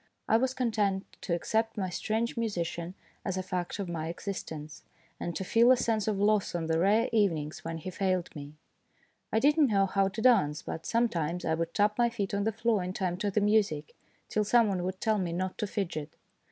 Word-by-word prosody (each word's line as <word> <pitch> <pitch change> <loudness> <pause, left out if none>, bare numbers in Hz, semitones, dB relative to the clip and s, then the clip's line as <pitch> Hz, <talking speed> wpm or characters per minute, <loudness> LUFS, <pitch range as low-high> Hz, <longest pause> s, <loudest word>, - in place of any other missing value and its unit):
I - - +4
was 260 +2 0
content 210 -6 0 0.2
to 170 - -1
accept 225 +6 -1
my 190 -3 -2
strange 220 +6 -1
musician 180 -6 -3 0.3
as 190 -1 -2
a 185 - -2
fact 180 -1 -3
of 200 -3 -3
my 165 -2 -3
existence, 160 -4 -6 0.4
and 170 - -4
to - - -2
feel 230 +6 +5
a 255 - +6
sense 220 -3 0
of 210 -2 +1
loss 205 -2 +2
on 170 -2 -1
the 160 0 +1
rare 210 +6 +3
evenings 165 -9 +1
when 165 0 -4
he 175 +4 -6
failed 185 -3 -1
me. 145 0 -8 0.8
I - - +1
did 290 +6 +4
not 290 -4 +5
know 195 -2 +3
how 195 0 +2
to 195 +3 -5
dance, 195 -11 +3
but 160 - -6
sometimes 180 -8 0
I 160 - +1
would 165 +1 -2
tap 210 +2 +2
my 240 0 +4
feet 205 -5 -3
on 200 0 0
the 220 - +2
floor 225 -1 +1
in 180 +1 -4
time 180 -2 -2
to 205 +2 -1
the 205 +2 +1
music, 200 -8 +1 0.3
till 210 - 0
some 230 +1 +4
one 190 -2 -1
would 185 0 -3
tell 220 -2 +2
me 175 -3 -2
not 185 +2 -3
to 210 - -1
fidget. 165 -7 -4
195 Hz, 220 wpm, -29 LUFS, 170-220 Hz, 0.8 s, a